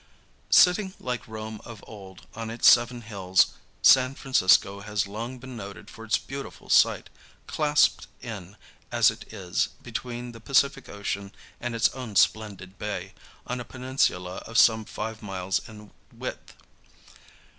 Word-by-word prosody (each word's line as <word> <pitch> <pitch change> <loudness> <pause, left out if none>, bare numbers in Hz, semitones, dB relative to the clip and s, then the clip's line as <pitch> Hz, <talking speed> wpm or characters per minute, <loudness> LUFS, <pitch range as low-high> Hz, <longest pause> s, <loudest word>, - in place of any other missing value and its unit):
Sitting, 190 +1 +5
like 125 -4 -4
Rome 110 -1 -7
of 115 -3 -11
old, 95 -3 -12
on 115 0 -5
its 115 +1 +2
seven 120 0 +5
hills, 95 -4 +2 0.3
San 130 0 +6
Francisco 100 -6 +3
has 105 0 -2
long 115 +6 -6
been 130 0 -10
noted 100 -3 -9
for 115 - -11
its 110 - +2
beautiful 135 +1 -8
site, - - +4 0.4
clasped 150 -1 +2
in, 105 -5 -8 0.3
as - - +5
it - - -12
is, 95 -5 -1
between 120 0 -5
the 115 - -12
Pacific 140 +1 +1
Ocean 100 -1 -4 0.3
and 120 -1 -4
its 115 +1 +4
own 125 -6 -8
splendid 100 -3 +1
bay, 95 -3 -4 0.3
on 125 0 -3
a - - -4
peninsula 120 -8 -1
of 115 +1 -3
some 110 -1 +5
five 110 +1 -6
miles 95 -1 -2
in 105 -1 -13 0.2
width. - - -7
110 Hz, 145 wpm, -26 LUFS, 100-125 Hz, 0.4 s, San